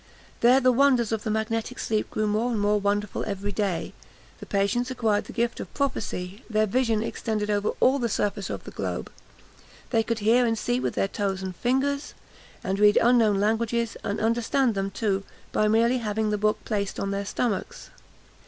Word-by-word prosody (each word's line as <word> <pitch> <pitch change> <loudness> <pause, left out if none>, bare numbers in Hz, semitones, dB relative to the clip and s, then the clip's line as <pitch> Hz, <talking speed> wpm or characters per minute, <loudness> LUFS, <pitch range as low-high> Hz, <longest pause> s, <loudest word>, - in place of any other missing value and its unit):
There 250 +3 +6
the 255 -1 +4
wonders 250 -3 +3
of 220 -2 -1
the - - -2
magnetic 220 +3 -2
sleep 215 -1 -1
grew 215 - -1
more 215 +3 +1
and 230 -3 -1
more 205 +1 +2
wonderful 205 0 -1
every 200 0 -3
day; 195 -4 -2 0.5
the - - -10
patients 205 +5 0
acquired 225 -5 0
the - - -9
gift 235 0 -1
of - - -7
prophecy; 210 -7 -3
their 215 -1 +2
vision 225 0 +1
extended 215 -2 -2
over 205 0 +1
all 270 +2 +4
the 235 -2 0
surface 200 -1 -1
of - - -5
the - - -9
globe; - - -4 0.8
they 225 -3 +3
could 230 0 -2
hear 225 +4 +4
and 225 -2 +1
see 245 +3 0
with - - -2
their - - +1
toes 195 -1 -2
and 185 -1 -5
fingers, 270 - -1 0.5
and 195 +1 -1
read 210 0 +6
unknown 225 -4 +4
languages, 225 +2 0
and 205 - -2
understand 235 +3 +1
them 195 -1 -2
too, 195 -1 -1 0.3
by 215 - +2
merely 230 +4 +3
having 215 -1 -1
the 210 - +1
book 215 0 0
placed 200 -3 -2
on 200 - -2
their 200 0 -2
stomachs. 205 +1 -3
220 Hz, 190 wpm, -26 LUFS, 205-235 Hz, 0.8 s, There